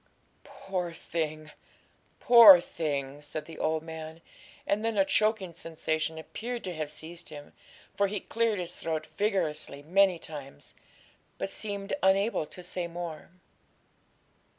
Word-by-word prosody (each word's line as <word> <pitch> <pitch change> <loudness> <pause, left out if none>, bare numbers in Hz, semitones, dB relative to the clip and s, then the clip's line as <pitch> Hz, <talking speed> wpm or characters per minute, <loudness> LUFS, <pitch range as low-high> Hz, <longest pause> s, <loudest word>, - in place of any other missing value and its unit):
'Poor 180 -3 -4
thing! 155 -2 -4 0.7
poor 225 -7 +10
thing!' 145 -4 -3
said 150 +1 -6
the 165 - -10
old 160 0 0
man; 160 0 -8 0.5
and 205 +2 0
then 225 -1 -1
a 195 - +5
choking 215 -4 +1
sensation 160 -1 -2
appeared 235 +9 -5
to 185 - -4
have 155 -2 -4
seized 160 +3 -8
him, 145 -1 -10 0.4
for 200 - +2
he 205 +1 -3
cleared 230 +1 0
his 175 -1 -4
throat 160 -2 -3
vigorously 165 -8 -1
many 185 +3 +4
times, 145 -4 -10 0.6
but 195 - -3
seemed 200 -2 -4
unable 195 -3 +2
to 180 - -10
say 175 0 -3
more. 170 -2 -7
170 Hz, 130 wpm, -29 LUFS, 155-195 Hz, 0.7 s, poor